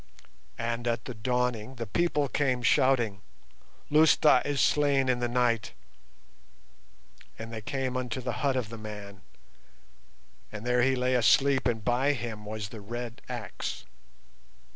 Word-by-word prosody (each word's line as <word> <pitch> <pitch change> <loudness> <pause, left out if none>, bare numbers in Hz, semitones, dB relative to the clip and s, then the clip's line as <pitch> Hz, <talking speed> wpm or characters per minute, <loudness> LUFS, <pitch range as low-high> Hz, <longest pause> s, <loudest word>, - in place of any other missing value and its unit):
"And 115 +1 -3
at 115 -1 -1
the 125 - -5
dawning 125 +1 -1
the 115 -1 -5
people 150 +4 +1
came 130 -3 0
shouting, 120 -5 +2 0.7
'Lousta 150 -3 +5
is 145 -1 -2
slain 140 -3 +3
in 125 -1 +1
the 120 - 0
night,' 120 -2 +1 1.6
and 115 +1 -8
they 110 - -5
came 130 +3 -3
unto 130 -1 -3
the 125 -1 -3
hut 140 -2 +1
of 125 -5 -2
the 115 -1 -8
man, 105 -2 -9 1.3
and 105 +2 -8
there 125 0 +2
he 130 +2 +3
lay 125 0 0
asleep 130 +3 +4
and 115 -3 -2
by 130 +4 +2
him 115 -5 -6
was 105 -1 -5
the 110 -1 -9
red 120 +2 -6
axe. - - -5
120 Hz, 140 wpm, -28 LUFS, 115-130 Hz, 1.6 s, Lousta